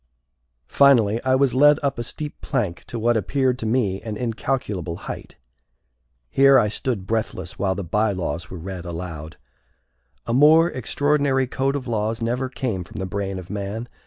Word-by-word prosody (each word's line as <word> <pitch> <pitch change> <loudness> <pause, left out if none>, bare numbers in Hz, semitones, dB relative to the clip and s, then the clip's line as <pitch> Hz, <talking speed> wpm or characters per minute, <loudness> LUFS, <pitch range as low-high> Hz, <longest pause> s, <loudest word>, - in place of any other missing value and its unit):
Finally, 115 - +4
I 130 0 +3
was 135 -1 +2
led 145 +2 +6
up 140 -3 -1
a - - -2
steep 150 +5 -6
plank 105 - -2
to 120 - -6
what 120 +1 +2
appeared 125 +4 0
to 110 - -3
me 110 -5 0
an 110 -1 -5
incalculable 110 -7 -2
height. - - -8 1.0
Here 135 0 +6
I 105 -4 +3
stood 115 -4 -3
breathless 95 -4 -3
while 95 -1 +1
the 100 - -4
bylaws 90 -3 -1
were 90 - -7
read 90 +1 -6
aloud. 80 -3 -7 0.9
A 115 - -2
more 155 +6 +6
extraordinary 140 +1 +1
code 135 +2 -1
of 135 -2 -3
laws 110 -1 -1
never 125 +3 -1
came 115 -8 -3
from 80 - -12
the 95 - -3
brain 95 0 -3
of 95 0 -8
man. 105 +3 -4
115 Hz, 165 wpm, -23 LUFS, 95-130 Hz, 1.0 s, led